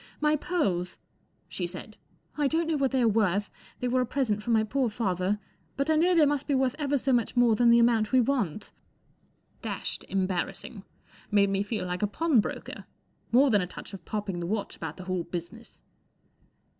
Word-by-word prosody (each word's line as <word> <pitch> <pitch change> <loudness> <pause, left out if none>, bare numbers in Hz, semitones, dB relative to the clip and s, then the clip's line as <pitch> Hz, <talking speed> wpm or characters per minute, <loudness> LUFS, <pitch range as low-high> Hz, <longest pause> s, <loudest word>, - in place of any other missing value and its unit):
" - - -32
My 305 - +3
pearls," 195 - -1 0.5
she 180 - -3
said. 185 +4 -8 0.2
" - - -41
I 295 -2 +1
don't 325 +4 +1
know 320 -1 0
what 275 -2 +1
they 260 -2 +1
are - - +4
worth—they 205 +3 -1
were 255 +1 +2
a - - +1
present 225 -7 0
from 235 +2 -1
my 220 -1 +4
poor 250 +3 0
father—but 210 - -2
I - - +4
know 350 +3 +4
they 320 -3 +6
must 290 -1 0
be 285 - +2
worth 260 -1 +2
ever 285 -1 +1
so 265 0 0
much 240 0 +1
more 240 -2 +5
than 240 +1 +4
the 235 - +7
amount 230 -2 +3
we 260 - +5
want," 230 - -1 0.9
Dashed - - -4
embarrassing. 190 +2 -2 0.5
Made 200 -1 +3
me 195 0 +1
feel 205 -1 -3
like 180 0 -3
a 210 - +2
pawnbroker. 285 0 -1 0.5
More 260 +3 +5
than 205 -3 +4
a 180 - -3
touch 190 - -10
of 195 - -9
popping 205 -4 -3
the 170 - -3
watch 210 +1 -3
about - - -6
the 185 - -8
whole 185 -1 -2
business. 175 +7 -8
225 Hz, 195 wpm, -28 LUFS, 195-270 Hz, 0.9 s, the